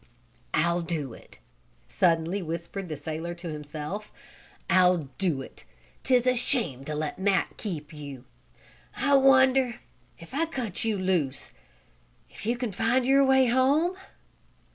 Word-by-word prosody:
"I'll 170 +1 +2
do 155 -7 -3
it!" - - -15 0.5
suddenly 170 +2 +1
whispered 170 +3 -5
the 155 - -4
sailor 160 +4 -5
to 170 0 -7
himself. 150 +7 -6 0.6
"I'll 180 -6 +3
do 165 -9 0
it! - - -14 0.4
'Tis 250 -2 +3
a 255 - +4
shame 230 - -1
to 150 - -4
let 150 +2 -3
Matt 195 0 +1
keep 160 -7 -6
you. 140 -4 -9 0.7
I 285 - +1
wonder, 265 -2 +5 0.4
if 165 - -14
I 325 +4 0
cut 250 - -3
you 220 -2 0
loose, 175 -8 -1 0.8
if - - -9
you 240 +1 +1
can 245 -3 -3
find 230 +6 +1
your 275 +1 +5
way 265 -1 +5
home? 275 +9 +3
185 Hz, 140 wpm, -27 LUFS, 160-255 Hz, 0.8 s, wonder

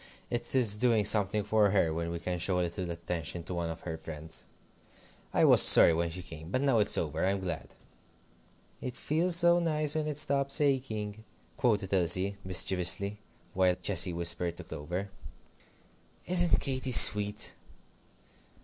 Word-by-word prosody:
It 120 +2 -3
is 115 -6 +3
doing 115 -2 0
something 105 0 0
for 105 0 0
her 95 -5 -1
when 85 +1 -5
we 85 - -6
can 90 +1 -6
show 90 +2 -2
a - - -1
little 85 +1 -7
attention 85 -1 -6
to 90 - -8
one 85 -1 -5
of 80 - -9
her 80 -2 -8
friends. 80 0 -10 0.8
I - - +1
was - - +6
sorry 85 - +9
when 85 +1 -3
she 90 +2 -10
came, 80 -1 -12
but 130 +7 -3
now 135 -5 0
it's 105 - +2
over, - - -4
I'm 95 +1 -2
glad." 90 -4 -8 1.1
"It 125 -1 -7
feels 165 +6 0
so 175 0 +4
nice 155 -3 -2
when 155 -1 -4
it 150 -2 -5
stops 140 -2 -1
aching," 110 -7 -4 0.3
quoted 105 -5 -2
Elsie, 95 +2 0
mischievously, 95 +2 0 0.3
while 90 -1 0
Cecy 95 -2 +2
whispered 85 0 -3
to 90 - -10
Clover. 85 +6 -8 1.1
"Isn't 175 -1 +2
Katy 130 -1 -4
sweet?" 105 -2 +6
100 Hz, 160 wpm, -27 LUFS, 85-125 Hz, 1.1 s, sorry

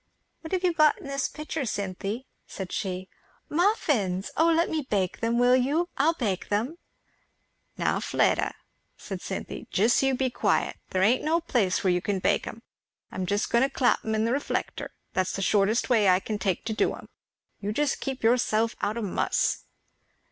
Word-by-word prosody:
"What 320 - -9
have 370 -1 0
you 355 -2 +3
got 305 -2 +4
in - - -12
this 275 -1 -1
pitcher, 305 0 -4
Cynthy?" 205 +2 -3 0.2
said 190 -2 -6
she. 185 -2 -3 0.4
"Muffins! 285 - +1
O 325 - +4
let 330 +1 +3
me 320 -1 -1
bake 190 -3 0
them, 230 +1 0
will 245 +1 +5
you? 290 +8 +1
I'll 320 +4 +2
bake 205 - -2
them." 235 +12 -1 1.0
"Now - - +1
Fleda," - - +1 0.4
said - - -7
Cynthy, - - -6
"just 220 +5 +3
you 270 -1 +2
be 260 0 0
quiet. - - 0
There 185 0 +1
ain't 235 +6 +3
no 320 +2 +2
place 230 - 0
where 185 -2 +3
you 180 - 0
can 200 +1 -1
bake 185 - +1
'em. 230 - -8 0.5
I'm 185 -1 -3
just 205 +2 0
going 235 - +4
to 270 - +2
clap 260 -3 +2
'em 220 0 -1
in 220 +1 +1
the 230 - +1
reflector 280 - -2 0.2
that's 185 0 0
the 195 - -2
shortest 210 +4 +2
way 220 -6 +4
I 180 0 +5
can 210 +1 -4
take 190 -4 -1
to 220 - -1
do - - +1
'em. - - -12 0.5
You 205 +1 -3
keep 270 0 -1
yourself 230 -1 +2
out 210 +2 -1
o' 230 - -2
muss." 195 - 0
230 Hz, 185 wpm, -27 LUFS, 200-275 Hz, 1.0 s, will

